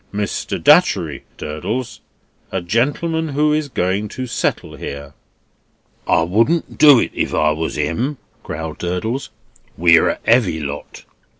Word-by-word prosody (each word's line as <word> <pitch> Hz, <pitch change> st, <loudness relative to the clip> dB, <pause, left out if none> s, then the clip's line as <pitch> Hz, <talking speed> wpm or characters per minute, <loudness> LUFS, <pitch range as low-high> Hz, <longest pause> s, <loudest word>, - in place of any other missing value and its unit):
Mr. 105 Hz, 0 st, -3 dB
Datchery, -, -, +3 dB
Durdles 105 Hz, +12 st, -4 dB, 0.5 s
a 95 Hz, -, -1 dB
gentleman 145 Hz, -, 0 dB
who 150 Hz, +2 st, +2 dB
is 150 Hz, -1 st, -1 dB
going 95 Hz, -1 st, -1 dB
to 130 Hz, +5 st, -6 dB
settle 120 Hz, -, -2 dB
here." 70 Hz, 0 st, -7 dB, 0.9 s
"I 80 Hz, -, +3 dB
wouldn't 115 Hz, -, 0 dB
do 145 Hz, -3 st, +8 dB
it -, -, 0 dB
if -, -, -2 dB
I 75 Hz, 0 st, +3 dB
was 80 Hz, +1 st, -3 dB
him," 100 Hz, -, -1 dB, 0.2 s
growled 80 Hz, 0 st, -6 dB
Durdles. 110 Hz, +10 st, -3 dB, 0.5 s
"We're 85 Hz, -1 st, +5 dB
a -, -, -3 dB
heavy 110 Hz, -9 st, +3 dB
lot." 75 Hz, -1 st, -7 dB
105 Hz, 130 wpm, -19 LUFS, 80-135 Hz, 0.9 s, do